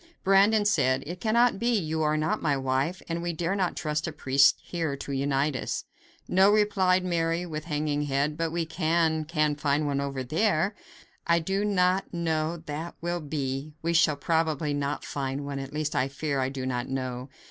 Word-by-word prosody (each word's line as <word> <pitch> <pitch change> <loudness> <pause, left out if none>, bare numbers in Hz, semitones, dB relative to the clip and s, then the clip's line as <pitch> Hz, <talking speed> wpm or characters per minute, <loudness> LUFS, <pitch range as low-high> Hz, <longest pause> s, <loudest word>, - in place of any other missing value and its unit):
Brandon 205 +2 +4
said: 135 -9 +2
"It 180 +3 -7
cannot 235 -1 +3
be; 235 0 +2
you 160 -4 -2
are 155 0 +2
not 155 +1 0
my 145 -3 +1
wife, 135 +7 -1
and 170 0 -2
we 175 0 -2
dare 170 +3 -1
not 190 -3 0
trust 150 +1 -2
a - - -3
priest 140 -2 +4
here 160 -5 -3
to 140 - -6
unite 140 +1 0
us." 130 - -3 0.4
"No," 190 +2 +5
replied 190 -3 +3
Mary, 170 0 0
with 155 -2 -5
hanging 150 -2 -1
head, 140 +2 0
"but 165 0 -2
we 170 0 -1
can 160 -1 +1
can 155 -2 +1
find 145 +1 0
one 140 -1 0
over 135 -2 -3
there." 170 - +1 0.5
"I 170 0 +4
do 195 +5 -1
not 190 -2 +1
know 160 -2 0
how 160 - -15
that 155 +3 -5
will 175 +1 -2
be; 145 0 -4
we 170 +1 0
shall 165 -3 +4
probably 155 -1 0
not 145 0 -2
find 140 0 -3
one; 140 -1 -4
at 135 0 -6
least, 155 +1 -2
I 135 - +2
fear; 140 0 -2
I 130 0 0
do 135 -1 -5
not 125 -1 -2
know." 130 -1 -4
155 Hz, 195 wpm, -27 LUFS, 140-175 Hz, 0.5 s, No